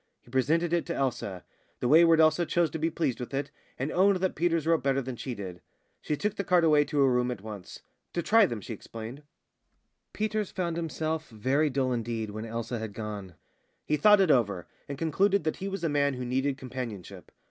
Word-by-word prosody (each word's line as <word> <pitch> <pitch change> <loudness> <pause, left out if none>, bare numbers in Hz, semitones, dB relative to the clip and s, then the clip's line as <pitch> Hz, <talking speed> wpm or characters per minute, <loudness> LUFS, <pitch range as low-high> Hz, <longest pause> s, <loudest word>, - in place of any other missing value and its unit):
He 120 - -19
presented 160 +6 +1
it 170 0 +1
to 170 - -2
Elsa. 105 -9 -2 0.4
The - - 0
wayward 165 +3 +6
Elsa 160 +2 +4
chose 170 -2 +1
to 160 - -4
be 160 +2 +1
pleased 155 -6 -1
with 125 +2 -5
it, 140 - -2 0.3
and 135 +4 -2
owned 195 +2 +4
that 185 0 0
Peters 165 -1 +1
wrote 165 0 +3
better 135 0 +1
than 130 -1 -4
she 125 +1 -5
did. 90 -4 -7 0.4
She 150 - -2
took 210 +4 -2
the 200 - -1
card 180 -2 +3
away 150 -2 +5
to 150 - -4
her 135 - +5
room 125 -1 +2
at 120 -6 -4
once 105 -4 -9 0.3
"to 170 - -1
try 225 +1 +5
them," 115 -8 -5
she 115 - -6
explained. 115 +5 -8 0.9
Peters 215 -1 -1
found 175 -3 -2
himself 160 -1 -3
very 130 +7 +1
dull 130 -1 0
indeed 115 -2 -3
when 110 +2 -6
Elsa 115 +1 -4
had 110 -2 -5
gone. 105 -4 -6 0.5
He 150 - +1
thought 210 +6 +6
it 185 -5 +4
over, 100 -9 +2 0.2
and 140 - -4
concluded 190 +5 +2
that 155 - -1
he 195 - -4
was 195 -2 -4
a - - +2
man 140 -2 +1
who 125 0 -4
needed 130 +2 0
companionship. 115 -8 -7
140 Hz, 215 wpm, -28 LUFS, 120-165 Hz, 0.9 s, wayward